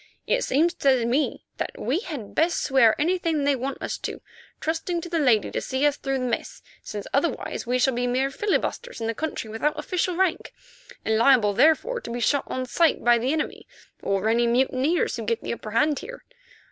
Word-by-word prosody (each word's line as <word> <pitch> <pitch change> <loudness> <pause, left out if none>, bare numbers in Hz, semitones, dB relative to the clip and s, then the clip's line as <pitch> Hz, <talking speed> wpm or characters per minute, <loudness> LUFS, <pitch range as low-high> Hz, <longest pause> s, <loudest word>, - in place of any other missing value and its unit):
It - - +1
seems 325 +6 +2
to 265 -7 +2
me 260 +6 0
that - - -3
we 260 +10 -1
had 295 - -7
best 335 +2 +1
swear 265 -5 +4
anything 330 -2 +1
they 285 0 +3
want 265 +1 -4
us - - -3
to, - - -5 0.4
trusting 330 +2 -2
to 345 - -7
the 335 -1 0
lady 245 -8 +3
to - - -2
see 265 +2 -1
us 290 -1 +3
through 270 -2 -2
the 255 - -2
mess, 240 - -4 0.2
since 205 -1 -6
otherwise 280 -3 -1
we 250 +1 +1
shall 265 +1 +2
be 245 +1 -1
mere 260 +2 0
filibusters 420 - -2
in 225 - -3
the 230 - -1
country 305 -3 -4
without 295 +8 -1
official 360 +3 -1
rank, 370 -1 0 0.5
and 220 0 +2
liable 230 -5 +5
therefore 320 - +3
to - - -8
be 240 +1 -3
shot 275 +4 +1
on 255 0 -3
sight 325 +5 +2
by 240 0 +5
the 250 +4 0
enemy, 315 0 -3 0.3
or 195 +1 0
any 235 +1 +3
mutineers 260 +7 +1
who 230 - -4
get 230 +1 -2
the - - -2
upper 215 - -7
hand 290 +6 +2
here. - - -9
270 Hz, 205 wpm, -25 LUFS, 235-320 Hz, 0.5 s, liable